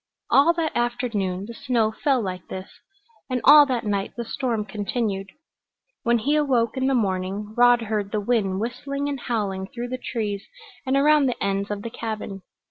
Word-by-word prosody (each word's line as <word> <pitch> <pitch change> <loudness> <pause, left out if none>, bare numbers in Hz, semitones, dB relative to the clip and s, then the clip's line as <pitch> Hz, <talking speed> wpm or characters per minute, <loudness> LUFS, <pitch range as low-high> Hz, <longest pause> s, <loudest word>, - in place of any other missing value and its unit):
All 285 +5 +6
that 330 -2 -2
afternoon 230 -6 -1
the 235 - -8
snow 235 -4 0
fell 260 +1 +1
like 185 -2 -5
this, 190 0 -7 0.6
and 255 -1 0
all 295 0 +9
that 245 -4 -1
night 200 -1 -1
the 235 - -3
storm 230 -3 -2
continued. 205 -1 -2 0.7
When 235 0 +3
he 280 +7 +1
awoke 255 -7 +2
in 260 0 0
the 270 - +2
morning 200 -1 -1
Rod 245 -1 +5
heard 210 -2 -2
the 215 - 0
wind 205 -3 0
whistling 275 +5 -3
and 280 -2 -3
howling 200 -6 -2
through 240 +3 -6
the 255 0 -4
trees 210 -6 -3 0.4
and 265 +1 +2
around 295 0 +5
the 250 - -1
ends 200 0 -1
of 205 -1 -4
the 230 - -5
cabin. 215 -4 -5
230 Hz, 180 wpm, -24 LUFS, 200-255 Hz, 0.7 s, all